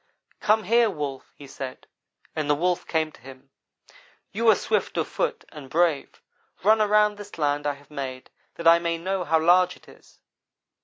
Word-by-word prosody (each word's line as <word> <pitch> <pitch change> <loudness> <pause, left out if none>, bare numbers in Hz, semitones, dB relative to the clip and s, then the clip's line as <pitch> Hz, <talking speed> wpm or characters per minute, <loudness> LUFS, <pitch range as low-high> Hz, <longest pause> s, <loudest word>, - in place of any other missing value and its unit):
"'Come 215 +1 +2
here, 230 +1 +3
Wolf,' 145 -7 -5
he 145 - -12
said, 135 -1 -8 0.5
and 155 -2 -2
the 145 - +4
Wolf 175 +3 -1
came 160 -1 0
to - - -19
him. 135 +1 -14 0.8
"'You 230 +3 -1
are - - +7
swift - - -1
of - - 0
foot 470 -3 -3
and 145 -4 -11
brave. 165 -3 0 0.4
Run 215 +2 +5
around 210 0 +3
this 205 -3 -11
land 145 -1 0
I 145 - 0
have 140 +1 -18
made, 130 -3 -6 0.2
that 170 - -2
I 170 0 +7
may 170 -1 -1
know 185 +2 -2
how 165 -2 +2
large 180 +2 +4
it - - -23
is.' - - -19
165 Hz, 185 wpm, -25 LUFS, 145-205 Hz, 0.8 s, are